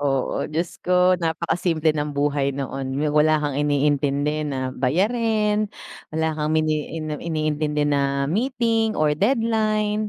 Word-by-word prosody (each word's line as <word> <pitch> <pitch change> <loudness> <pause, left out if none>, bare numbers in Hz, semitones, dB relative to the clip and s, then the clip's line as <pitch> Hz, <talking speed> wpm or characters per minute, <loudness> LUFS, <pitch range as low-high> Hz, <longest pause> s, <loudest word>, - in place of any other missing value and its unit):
Oo, 135 -2 -1
Diyos 165 +2 -3
ko 180 0 +3
napakasimple 165 -1 0
ng 145 -1 -3
buhay 140 -1 0
noon 135 -1 -4
yung 150 +1 0
wala 155 +1 +4
kang 145 -1 -1
iniintindi 145 +1 +1
na 130 -2 -3
bayarin, 210 - +1 0.4
wala 160 0 0
kang 150 0 -1
mini 155 -1 0 0.3
iniintindi 155 -2 -1
na 140 -1 +1
meeting 225 - 0
or 150 -1 +2
deadline 215 - +1
155 Hz, 125 wpm, -23 LUFS, 145-200 Hz, 0.4 s, wala